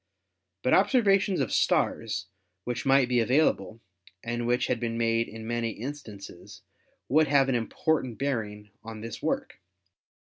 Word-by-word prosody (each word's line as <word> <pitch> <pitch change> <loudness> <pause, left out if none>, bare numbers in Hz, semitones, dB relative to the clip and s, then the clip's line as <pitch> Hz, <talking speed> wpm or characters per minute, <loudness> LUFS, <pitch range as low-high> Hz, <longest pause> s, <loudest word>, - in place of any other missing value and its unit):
But 125 - +2
observations 195 - +3
of 130 - -2
stars - - +1 0.4
which 125 +3 -4
might 135 -1 +5
be 125 -1 +2
available, 115 -4 +1 0.4
and 120 0 -3
which 120 +1 +1
had 120 - -1
been 115 -1 -3
made 115 0 +1
in 110 0 -9
many 120 0 -1
instances, 115 -6 -9 0.4
would 155 +3 +3
have 135 -1 +3
an - - +1
important 125 +1 -1
bearing 105 -7 -3
on 110 -1 -8
this 115 +1 -7
work. 270 0 -2
120 Hz, 140 wpm, -27 LUFS, 115-140 Hz, 0.4 s, might